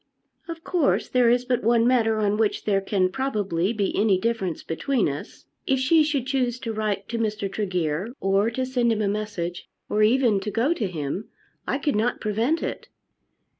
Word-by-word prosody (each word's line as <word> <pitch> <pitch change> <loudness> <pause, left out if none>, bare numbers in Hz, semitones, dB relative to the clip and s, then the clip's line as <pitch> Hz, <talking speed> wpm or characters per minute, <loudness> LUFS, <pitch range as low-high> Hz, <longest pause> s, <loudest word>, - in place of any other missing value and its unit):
"Of 330 -1 -7
course 340 -6 +1
there 250 -2 +4
is 245 +1 +2
but 250 -1 0
one 230 +1 +3
matter 225 -3 +3
on 210 -1 +1
which 215 -2 0
there 195 -2 +2
can, 190 -2 +1
probably, 205 -8 -1
be 205 -4 -1
any 200 -3 +3
difference 195 -6 -2
between 240 - 0
us. 145 0 -7 0.2
If 270 - +3
she 285 +5 +4
should 295 -4 0
choose 255 -3 0
to 225 -2 -3
write 210 -2 -2
to 235 - -2
Mr. 210 -2 -1
Tregear, 180 -1 -2
or 195 +3 +2
to 255 +2 -2
send 250 -2 +1
him 215 -1 0
a - - +1
message, 200 -4 -4 0.2
or 210 - +1
even 225 -1 +4
to 205 +2 -4
go 230 - +1
to 230 - -2
him, 165 +3 -4 0.4
I - - 0
could 290 -2 -1
not 225 +4 0
prevent 230 +10 0
it." - - -5
220 Hz, 190 wpm, -24 LUFS, 200-250 Hz, 0.4 s, there